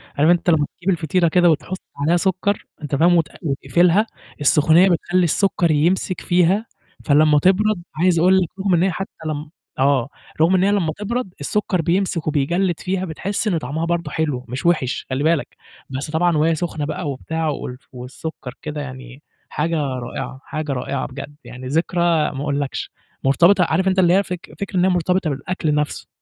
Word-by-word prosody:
عارف 150 Hz, +4 st, +3 dB
أنت 175 Hz, 0 st, +3 dB
لمّا 155 Hz, -3 st, +3 dB
تجيب 185 Hz, +2 st, -3 dB
الفطيرة 170 Hz, 0 st, +1 dB
كده 175 Hz, +1 st, +4 dB
وتحط 165 Hz, +4 st, -1 dB, 0.2 s
عليها 160 Hz, +5 st, +2 dB
سُكّر، 190 Hz, +2 st, 0 dB, 0.2 s
أنت 145 Hz, -2 st, -2 dB
فاهم، 175 Hz, +4 st, +4 dB
وت 160 Hz, -3 st, +2 dB
وتقفلها، 170 Hz, -, +2 dB, 0.3 s
السخونيّة 160 Hz, +5 st, +5 dB
بتخلّي 175 Hz, +1 st, +1 dB
السُكّر 175 Hz, -1 st, +2 dB
يمسك 175 Hz, +4 st, +1 dB
فيها، 180 Hz, +5 st, +2 dB, 0.4 s
فلمّا 150 Hz, 0 st, +5 dB
تبرد 190 Hz, +1 st, +2 dB
عايز 170 Hz, +1 st, +2 dB
أقُول 185 Hz, +2 st, +5 dB
لك 175 Hz, -, -1 dB
رغم 190 Hz, -1 st, +1 dB
إن 170 Hz, +1 st, +3 dB
هي 190 Hz, -, +2 dB
حتى 195 Hz, +3 st, -5 dB, 0.2 s
لمّ 150 Hz, 0 st, -4 dB, 0.3 s
آه، 135 Hz, -1 st, +2 dB, 0.3 s
رغم 175 Hz, +4 st, +4 dB
إن 185 Hz, -, +3 dB
هي 200 Hz, -, +3 dB
لمّا 175 Hz, -6 st, +1 dB
تبرد 210 Hz, -2 st, -3 dB
السُكّر 185 Hz, +3 st, 0 dB
بيمسك 175 Hz, -1 st, 0 dB
وبيجلّد 170 Hz, +4 st, 0 dB
فيها 190 Hz, 0 st, -2 dB
بتحس 195 Hz, +6 st, -3 dB
إن 175 Hz, -5 st, +1 dB
طعمها 155 Hz, +3 st, -3 dB
برضه 170 Hz, -3 st, -2 dB
حلو، 145 Hz, -6 st, -2 dB
مش 130 Hz, +6 st, -6 dB
وِحِش 155 Hz, -7 st, +1 dB
خلّي 130 Hz, +3 st, -1 dB
بالك، 160 Hz, -1 st, 0 dB, 0.3 s
بس 135 Hz, +4 st, -5 dB
طبعًا 165 Hz, 0 st, +2 dB
وهي 160 Hz, +2 st, +3 dB
سخنة 155 Hz, -2 st, -3 dB
بقى 155 Hz, 0 st, -4 dB
وبتاع 160 Hz, +4 st, -3 dB
وال 125 Hz, -3 st, -5 dB
والسُكّر 125 Hz, +1 st, -8 dB
كده 150 Hz, -1 st, -5 dB
يعني 130 Hz, 0 st, -9 dB, 0.3 s
حاجة 165 Hz, +2 st, -1 dB
رائعة، 130 Hz, -1 st, -4 dB
حاجة 155 Hz, -2 st, -4 dB
رائعة 130 Hz, +1 st, -3 dB
بجد، 140 Hz, +2 st, -9 dB
يعني 130 Hz, +1 st, -9 dB
ذكرى 170 Hz, +4 st, 0 dB, 0.3 s
ما 135 Hz, -, -6 dB
أقولكش، 145 Hz, -1 st, -3 dB, 0.3 s
مرتبطة 175 Hz, +8 st, +5 dB
عارف 175 Hz, +4 st, +1 dB
أنت 190 Hz, 0 st, +2 dB
اللي 175 Hz, -1 st, +5 dB
هي 200 Hz, +1 st, +4 dB
فك 180 Hz, -2 st, -7 dB
فكرة 200 Hz, -2 st, -3 dB
إن 180 Hz, -, +4 dB
هي -, -, +3 dB
مرتبطة 180 Hz, -1 st, +1 dB
بالأكل 150 Hz, +2 st, -2 dB
نَفْسُه، 150 Hz, 0 st, -2 dB
165 Hz, 180 wpm, -20 LUFS, 145-180 Hz, 0.4 s, السخونيّة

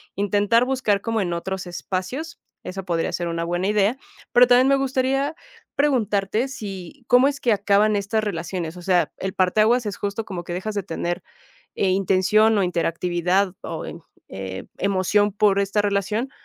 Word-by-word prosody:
intentar 205 Hz, +4 st, +2 dB
buscar 250 Hz, -6 st, +1 dB
como 225 Hz, 0 st, -1 dB
en 175 Hz, -3 st, -2 dB
otros 190 Hz, +2 st, -4 dB
espacios, 190 Hz, -, -5 dB, 0.2 s
eso 190 Hz, 0 st, -6 dB
podría 170 Hz, -3 st, -1 dB
ser 175 Hz, -, -2 dB
una 165 Hz, 0 st, -2 dB
buena 175 Hz, +3 st, -1 dB
idea. 210 Hz, +3 st, +2 dB, 0.4 s
Pero 245 Hz, 0 st, +7 dB
también 250 Hz, +2 st, +5 dB
me 275 Hz, -, +5 dB
gustaría 270 Hz, +2 st, 0 dB, 0.4 s
preguntarte 225 Hz, -5 st, +1 dB
si, 200 Hz, +1 st, -8 dB
¿cómo 250 Hz, +2 st, +5 dB
es 280 Hz, -1 st, -6 dB
que 240 Hz, -, +2 dB
acaban 205 Hz, +1 st, +3 dB
estas 210 Hz, +2 st, -1 dB
relaciones? 175 Hz, -3 st, -4 dB
O 180 Hz, -, -9 dB
sea, 180 Hz, 0 st, +2 dB
el 190 Hz, 0 st, -4 dB
parteaguas 215 Hz, +6 st, +2 dB
es 205 Hz, -, -4 dB
justo 205 Hz, +2 st, -3 dB
como 180 Hz, -5 st, -6 dB
que 175 Hz, -, -5 dB
dejas 210 Hz, +4 st, -4 dB
de 200 Hz, -, -1 dB
tener, 175 Hz, 0 st, -3 dB, 0.5 s
eh, 195 Hz, -, +1 dB
intención 195 Hz, +3 st, +3 dB
o 195 Hz, -, +2 dB
interactividad 175 Hz, +2 st, 0 dB
o -, -, -5 dB
en, -, -, -8 dB, 0.3 s
eh, 95 Hz, -1 st, -6 dB
emoción 200 Hz, +2 st, +2 dB
por 200 Hz, -1 st, +3 dB
esta 200 Hz, +1 st, +1 dB
relación. 205 Hz, +5 st, -1 dB
200 Hz, 170 wpm, -23 LUFS, 185-225 Hz, 0.5 s, Pero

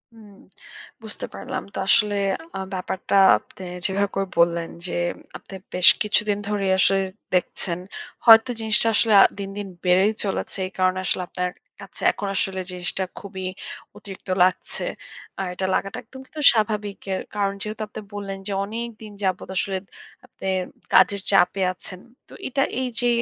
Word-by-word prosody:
হুম, 215 Hz, -2 st, -15 dB, 0.7 s
বুঝতে 215 Hz, -, -4 dB
পারলাম। 255 Hz, 0 st, -5 dB
তো -, -, -7 dB
আসলে 210 Hz, 0 st, +4 dB, 0.4 s
আ -, -, -4 dB
ব্যাপারটা 185 Hz, +1 st, -2 dB, 0.2 s
আপনে 190 Hz, -, -14 dB, 0.2 s
যেভাবে 200 Hz, 0 st, +1 dB
করে 195 Hz, 0 st, 0 dB
বললেন 170 Hz, 0 st, +3 dB, 0.2 s
যে, -, -, -4 dB, 0.4 s
আপনি 195 Hz, -, -12 dB, 0.2 s
বেশ 180 Hz, 0 st, +8 dB
কিছুদিন 210 Hz, -1 st, +1 dB
ধরেই 200 Hz, -2 st, 0 dB
আসলে 195 Hz, 0 st, +4 dB, 0.3 s
দেখছেন। 175 Hz, -1 st, -1 dB, 0.5 s
হয়তো 225 Hz, +2 st, +9 dB
জিনিসটা 220 Hz, +1 st, +3 dB
আসলে 220 Hz, -2 st, +3 dB, 0.3 s
দিন, 195 Hz, -1 st, -4 dB
দিন 205 Hz, -1 st, -4 dB, 0.2 s
বেড়েই 190 Hz, +4 st, +4 dB
চলেছে। 195 Hz, -, -3 dB
এই -, -, -13 dB
কারণে 185 Hz, 0 st, +2 dB
আসলে 185 Hz, -, 0 dB
আপনার 180 Hz, 0 st, -2 dB, 0.3 s
কাছে -, -, -10 dB
এখন 200 Hz, -, -5 dB
আসলে 190 Hz, 0 st, -1 dB
জিনিসটা 180 Hz, +1 st, -2 dB, 0.2 s
খুবই 190 Hz, -2 st, -6 dB, 0.5 s
অতিরিক্ত 195 Hz, -1 st, -11 dB
লাগছে। 185 Hz, 0 st, 0 dB, 0.5 s
আর 190 Hz, -, -1 dB
এটা 190 Hz, +1 st, -3 dB
লাগাটা 195 Hz, 0 st, -2 dB
একদম 260 Hz, +3 st, -13 dB
কিন্তু 300 Hz, +2 st, -8 dB
স্বাভাবিক। 210 Hz, -2 st, -1 dB
এর -, -, -2 dB
কারণ 200 Hz, -1 st, +1 dB
যেহেতু 215 Hz, +1 st, -4 dB
আপনি 210 Hz, -, -8 dB
বললেন 195 Hz, -1 st, -5 dB
যে, -, -, -3 dB
অনেকদিন 225 Hz, -1 st, -7 dB
যাবত 185 Hz, -1 st, -1 dB
আসলে 195 Hz, 0 st, 0 dB, 0.5 s
আপনি 190 Hz, -, -9 dB, 0.5 s
কাজের 200 Hz, -1 st, +5 dB
চাপে 190 Hz, 0 st, +3 dB
আছেন। 185 Hz, 0 st, -6 dB, 0.3 s
তো -, -, -15 dB
এটা 275 Hz, +1 st, 0 dB, 0.2 s
এইযে 245 Hz, -1 st, -1 dB
195 Hz, 150 wpm, -23 LUFS, 185-215 Hz, 0.7 s, হয়তো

